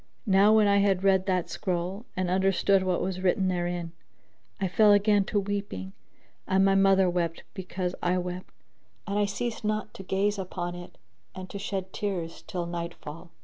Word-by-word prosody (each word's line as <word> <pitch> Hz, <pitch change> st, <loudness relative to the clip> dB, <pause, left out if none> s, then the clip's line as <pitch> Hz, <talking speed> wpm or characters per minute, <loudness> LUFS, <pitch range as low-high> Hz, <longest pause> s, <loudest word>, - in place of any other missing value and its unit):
Now 200 Hz, 0 st, +5 dB
when 215 Hz, -1 st, +5 dB
I 200 Hz, 0 st, +4 dB
had 195 Hz, -2 st, +2 dB
read 190 Hz, -1 st, +3 dB
that 185 Hz, -2 st, 0 dB
scroll 185 Hz, +4 st, -3 dB
and 185 Hz, -1 st, 0 dB
understood 190 Hz, +1 st, +3 dB
what 185 Hz, -1 st, 0 dB
was 185 Hz, -1 st, -3 dB
written 190 Hz, 0 st, +2 dB
therein, 175 Hz, -1 st, -2 dB, 0.7 s
I 190 Hz, -, 0 dB
fell 210 Hz, +3 st, +5 dB
again 205 Hz, -1 st, +3 dB
to 205 Hz, -, 0 dB
weeping, 200 Hz, -, -4 dB, 0.5 s
and 190 Hz, 0 st, +3 dB
my 195 Hz, -, +4 dB
mother 195 Hz, -1 st, +4 dB
wept 175 Hz, -2 st, -1 dB
because 185 Hz, -1 st, -4 dB
I 180 Hz, +1 st, +1 dB
wept, 180 Hz, 0 st, -5 dB, 0.5 s
and 205 Hz, 0 st, -1 dB
I 205 Hz, -, +3 dB
ceased 225 Hz, +3 st, -4 dB
not 215 Hz, 0 st, -2 dB
to -, -, -9 dB
gaze 195 Hz, +2 st, 0 dB
upon 175 Hz, -2 st, -4 dB
it 175 Hz, 0 st, -10 dB, 0.4 s
and 185 Hz, -1 st, -8 dB
to 200 Hz, -, -6 dB
shed 190 Hz, -1 st, -4 dB
tears 180 Hz, -5 st, -3 dB
till 175 Hz, -2 st, -3 dB
night 170 Hz, 0 st, -5 dB
fall. 165 Hz, +4 st, -10 dB
190 Hz, 180 wpm, -27 LUFS, 180-200 Hz, 0.7 s, Now